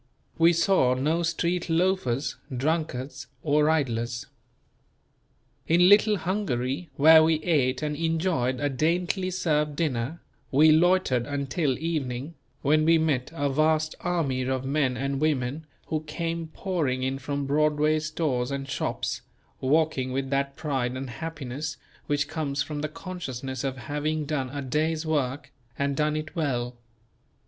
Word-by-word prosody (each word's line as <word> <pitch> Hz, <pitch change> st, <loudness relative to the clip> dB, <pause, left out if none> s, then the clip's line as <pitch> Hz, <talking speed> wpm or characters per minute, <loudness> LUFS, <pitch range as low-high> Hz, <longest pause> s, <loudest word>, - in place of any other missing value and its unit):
We 165 Hz, +1 st, +7 dB
saw 170 Hz, -7 st, +3 dB
no 155 Hz, +6 st, +1 dB
street 170 Hz, +1 st, -1 dB
loafers, 160 Hz, -8 st, +1 dB, 0.2 s
drunkards 145 Hz, -2 st, -2 dB, 0.2 s
or 150 Hz, 0 st, +3 dB
idlers. 120 Hz, -6 st, 0 dB, 1.4 s
In 175 Hz, +2 st, +5 dB
"Little 210 Hz, +1 st, +6 dB
Hungary," 170 Hz, -6 st, -2 dB
where 160 Hz, +2 st, +8 dB
we 160 Hz, 0 st, +4 dB
ate 140 Hz, -5 st, +1 dB
and 150 Hz, -1 st, -1 dB
enjoyed 160 Hz, -5 st, 0 dB
a 145 Hz, -, +1 dB
daintily 175 Hz, +7 st, 0 dB
served 150 Hz, -5 st, 0 dB
dinner, 145 Hz, 0 st, -1 dB, 0.3 s
we 155 Hz, +3 st, +6 dB
loitered 160 Hz, -7 st, +3 dB
until 140 Hz, 0 st, -1 dB
evening, 145 Hz, -2 st, -3 dB, 0.3 s
when 155 Hz, +2 st, +4 dB
we 165 Hz, +1 st, +5 dB
met 145 Hz, -6 st, 0 dB
a 145 Hz, -3 st, 0 dB
vast 155 Hz, +2 st, +2 dB
army 160 Hz, -8 st, 0 dB
of 130 Hz, 0 st, -1 dB
men 135 Hz, -2 st, +1 dB
and 135 Hz, +2 st, -2 dB
women 150 Hz, 0 st, 0 dB, 0.2 s
who 155 Hz, -1 st, 0 dB
came 165 Hz, +1 st, -3 dB
pouring 155 Hz, -7 st, -2 dB
in 135 Hz, +1 st, -1 dB
from 140 Hz, +1 st, -3 dB
Broadway's 150 Hz, +1 st, +2 dB
stores 140 Hz, -6 st, -1 dB
and 140 Hz, -1 st, -4 dB
shops, 130 Hz, -, -2 dB, 0.4 s
walking 135 Hz, -2 st, +1 dB
with 135 Hz, +1 st, -2 dB
that 140 Hz, 0 st, 0 dB
pride 130 Hz, -5 st, -2 dB
and 130 Hz, -1 st, -5 dB
happiness 145 Hz, -1 st, -5 dB, 0.3 s
which 145 Hz, -1 st, +1 dB
comes 145 Hz, -3 st, -2 dB
from 150 Hz, -1 st, -5 dB
the 150 Hz, -, -2 dB
consciousness 135 Hz, -8 st, -6 dB
of 135 Hz, -1 st, -2 dB
having 150 Hz, +3 st, -2 dB
done 140 Hz, -3 st, -2 dB
a 140 Hz, +2 st, -5 dB
day's 155 Hz, +4 st, 0 dB
work, 145 Hz, -3 st, -1 dB, 0.3 s
and 140 Hz, 0 st, 0 dB
done 150 Hz, 0 st, +1 dB
it 155 Hz, +3 st, -5 dB
well. 125 Hz, -6 st, -1 dB
150 Hz, 140 wpm, -26 LUFS, 130-160 Hz, 1.4 s, where